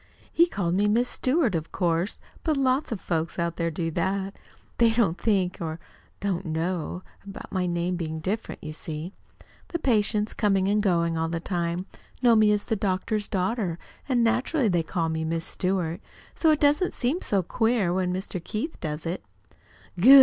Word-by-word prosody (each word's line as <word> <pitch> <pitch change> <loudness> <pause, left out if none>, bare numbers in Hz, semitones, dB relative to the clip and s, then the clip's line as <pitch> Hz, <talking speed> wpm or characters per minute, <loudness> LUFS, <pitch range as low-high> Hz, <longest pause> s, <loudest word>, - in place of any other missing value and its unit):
He 340 +1 +5
called 175 - -1
me 200 +3 +3
Miss 235 +4 +3
Stewart, 260 - +1
of 165 -1 -2
course 175 +1 0 0.3
but 310 -3 +1
lots 265 +1 +1
of 220 - -2
folks 165 -2 -2
out 170 -1 -1
there 170 -1 0
do 165 0 -2
that. 190 +4 -1 0.4
They 235 -1 +6
don't 215 -7 +2
think, 190 -3 +1
or 160 0 -3 0.4
don't 190 -2 -1
know, 170 +1 -2 0.2
about 200 0 -9
my 185 -2 0
name 175 +1 -1
being 160 -2 -3
different, 195 +7 -3
you 155 - -5
see. 160 +3 -5 0.5
The 340 - -2
patients, 215 -6 +1
coming 195 -3 +2
and 210 +1 +3
going 170 -4 +1
all 165 0 0
the 165 0 -2
time, 175 0 -2 0.4
know 235 -2 +7
me 215 -1 +5
as 205 -1 +1
the 225 - -1
doctor's 205 +1 0
daughter, 185 -2 -1 0.3
and 245 -3 +3
naturally 240 - +2
call 165 0 -1
me 160 0 -1
'Miss 165 +1 -1
Stewart.' 180 -4 -1 0.3
So 325 - +2
it 305 -1 +4
doesn't 295 +5 +3
seem 270 +9 0
so 195 -3 +1
queer 220 -2 +1
when 185 -1 0
Mr. 185 -1 -4
Keith 230 - -4
does 155 0 -4
it." 170 +3 -3 0.8
"Good!" 265 +9 +10
190 Hz, 180 wpm, -26 LUFS, 170-225 Hz, 0.8 s, Good